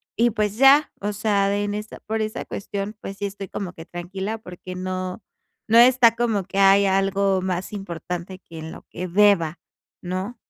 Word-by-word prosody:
y 235 +1 +3
pues, 210 -2 -1
ya, 275 +4 +6
o 205 +1 -1
sea, 200 -1 +1
en 205 0 -1
esa 210 +1 -6
por 220 0 -2
esa 215 0 -3
cuestión, 200 +1 -5
pues 195 - -7
sí, 205 - -3
estoy 195 0 -6
como 185 -3 -5
que 165 - -11
tranquila, 190 +5 -5
porque 185 -3 -9
no 185 +2 -4 0.4
no 225 +1 +4
está 245 -2 +6
como 225 -4 0
que 195 +1 -7
hay 195 +1 +6
algo 195 0 +2
más 185 +1 -3
importante 180 -1 -6
que 165 -3 -13
en 160 0 -7
lo - - -11
que 180 +2 -5
deba, 180 -4 +3 0.4
¿no? 185 +6 -4
195 Hz, 185 wpm, -23 LUFS, 185-210 Hz, 0.4 s, ya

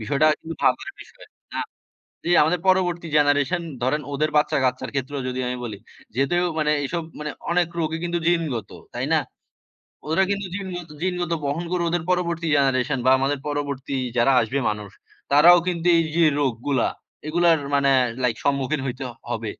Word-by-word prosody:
বিষয়টা 140 +8 +2
কিন্তু 165 0 -7
ভাবার - - +1
বিষয়। - - -14 1.0
যে 175 - -1
আমাদের 165 +3 +1
পরবর্তী 175 -2 +2
জেনারেশন 145 +4 +2 0.2
ধরেন, 140 +4 +1
ওদের 155 +2 0
বাচ্চা-কাচ্চার 130 -4 +1
ক্ষেত্রেও 135 +1 -3
যদি 130 0 -4
আমি 125 0 -2
বলি, 105 -4 -6 0.4
যেহেতু 175 +7 +2
মানে 150 -1 +2
এসব 170 +4 -2 0.5
অনেক 175 0 +3
রোগই 160 0 -1
কিন্তু 175 0 -1
জিনগত, 155 - -1 0.3
তাই - - -1
না? - - +4 0.9
ওরা 165 +5 +3
কিন্তু 200 -1 -1
জিনগত, 180 -4 -6
জিনগত 180 -2 -1
বহন 145 +5 -2
করে, 180 -1 +1
ওদের 175 -1 0
পরবর্তী 170 -2 0
জেনারেশন 135 -1 +1
বা - - +6
আমাদের 140 +1 0
পরবর্তী 140 -1 -3 0.2
যারা 120 +3 +4
আসবে 125 +5 -1
মানুষ, 105 -2 -6 0.4
তারাও 175 +5 +8
কিন্তু 170 -1 -2
এই 165 - +2
যে 170 - +5 0.2
রোগগুলা, 130 0 0 0.4
এগুলার 170 0 +3 0.2
মানে 140 -1 +3 0.3
লাইক 115 -3 +1
সম্মুখীন 140 +1 0
হইতে 130 +1 -4 0.3
হবে। 115 -1 -3
150 Hz, 155 wpm, -23 LUFS, 135-170 Hz, 1.0 s, তারাও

